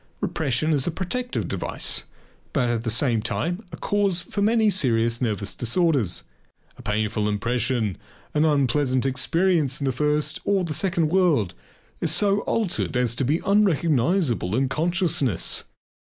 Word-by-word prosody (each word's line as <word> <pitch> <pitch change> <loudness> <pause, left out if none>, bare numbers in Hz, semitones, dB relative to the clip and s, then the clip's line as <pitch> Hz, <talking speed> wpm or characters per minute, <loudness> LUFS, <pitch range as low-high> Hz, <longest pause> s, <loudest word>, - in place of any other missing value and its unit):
Repression 155 +2 0
is 140 -3 +1
a - - +3
protective 220 +9 -3
device - - -1 0.5
but 125 -4 +1
at 115 -1 -1
the 115 - -1
same 115 0 +1
time 175 - -2
a - - -7
cause 200 -3 +1
for 180 +3 -4
many 220 +1 +3
serious 115 - +1
nervous 105 -4 -1
disorders. 130 - +1 0.5
A - - -13
painful 105 0 -1
impression, 115 -1 -1 0.3
an 150 - +2
unpleasant 140 -3 +2
experience 150 +2 +1
in 140 - -2
the 135 - +2
first 150 +3 0
or 200 -2 +1
the 165 -3 -2
second 170 0 +1
world, 160 - +2 0.5
is 165 - 0
so 200 +5 +2
altered 200 - -1
as 125 -2 +1
to 125 - -2
be 150 +6 +1
unrecognizable 165 - +2
in 130 +1 +1
consciousness. 165 - 0
145 Hz, 145 wpm, -24 LUFS, 120-175 Hz, 0.5 s, a